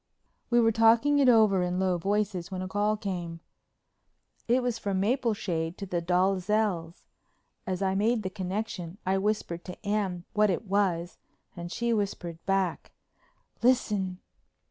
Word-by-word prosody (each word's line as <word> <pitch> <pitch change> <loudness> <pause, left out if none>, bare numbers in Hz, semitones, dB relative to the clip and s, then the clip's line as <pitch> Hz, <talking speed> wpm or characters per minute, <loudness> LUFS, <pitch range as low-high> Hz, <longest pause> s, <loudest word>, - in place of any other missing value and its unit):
We 240 0 +4
were 225 -1 +4
talking 230 +6 +4
it 270 -2 +5
over 215 -5 +5
in 180 0 -1
low 185 -2 +1
voices 200 -1 -1
when 185 -1 -4
a - - -4
call 205 +2 0
came. 175 -5 -4 1.1
It 245 +2 +3
was 240 -2 -1
from 195 -3 -1
Mapleshade 200 -7 -1
to 200 - -5
the 180 -2 -2
Dalzells'. 185 0 0 0.6
As 185 0 -2
I 190 0 +1
made 215 +3 +1
the 185 - -3
connection 185 -2 -4
I 190 +1 +1
whispered 195 -4 -2
to 180 +3 -10
Anne 200 -4 -1
what 210 -1 +3
it 190 +4 -1
was 185 -3 0 0.4
and 175 -1 -7
she 235 +2 0
whispered 175 -6 -3
back, 195 -3 -1 0.7
"Listen." 210 -7 +1
195 Hz, 145 wpm, -28 LUFS, 180-215 Hz, 1.1 s, it